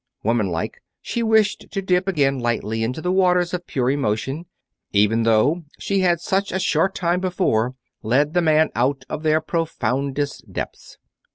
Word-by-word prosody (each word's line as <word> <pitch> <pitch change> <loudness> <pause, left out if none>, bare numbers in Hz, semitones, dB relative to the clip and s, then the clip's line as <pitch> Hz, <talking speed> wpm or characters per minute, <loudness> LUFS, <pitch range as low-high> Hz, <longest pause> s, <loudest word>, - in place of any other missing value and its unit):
Woman 110 -2 +1
like, 85 -2 -4 0.2
she 235 - -3
wished 220 -2 +2
to 195 - -3
dip 185 -1 +1
again 140 -7 +1
lightly 115 -2 -1
into 125 +7 -3
the 180 - 0
waters 180 -2 +2
of 175 -1 -4
pure 130 -1 0
emotion, 135 +5 -2 0.4
even 105 +3 +3
though 115 +10 +3
she 200 -1 -1
had 175 -3 +2
such 195 +3 -1
a 190 - -1
short 190 0 +1
time 175 0 +1
before 175 - 0 0.3
led 140 +7 +1
the 175 - +3
man 155 -1 +3
out 135 +4 0
of 155 - -4
their 155 0 +3
profoundest 145 -4 -2
depths. - - -6
155 Hz, 165 wpm, -22 LUFS, 120-180 Hz, 0.4 s, even